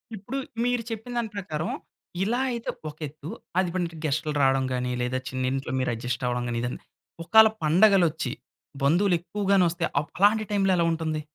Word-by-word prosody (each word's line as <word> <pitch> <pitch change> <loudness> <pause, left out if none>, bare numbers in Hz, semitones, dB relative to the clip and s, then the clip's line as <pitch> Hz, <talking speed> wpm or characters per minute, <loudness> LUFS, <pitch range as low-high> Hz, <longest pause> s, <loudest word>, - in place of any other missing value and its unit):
ఇప్పుడు 215 +7 -6 0.3
మీరు 245 -1 +1
చెప్పిన 225 +2 -6
దాని 235 -2 -1
ప్రకారం 160 -5 -3 0.5
ఇలా 235 +5 0
అయితే 235 -1 -4 0.2
ఒకేత్తు. 150 0 -8 0.3
అది 185 -2 +1
మనకి 170 -3 -2
గెస్ట్లు 155 +1 0
రావడం 135 -1 +3
గానీ, 125 0 -1
లేదా 125 +1 -1
చిన్నింట్లో 130 +1 -2
మీరు 130 - 0
అడ్జస్ట్ 120 +2 -3
అవ్వడం 120 0 -1
గానీ, 115 0 -2 0.6
ఒకళ 220 +5 +7 0.2
పండగలొచ్చి 165 - +4 0.5
బంధువులు 175 +6 +3
ఎక్కువగానోస్తే 185 -2 +1 0.2
ఆప్ 145 - -6
అలాంటి 210 +3 +4
టైంలో 195 -2 +2
ఎలా 170 - +2
ఉంటుంది? 160 -2 -2
165 Hz, 150 wpm, -26 LUFS, 135-200 Hz, 0.6 s, ఒకళ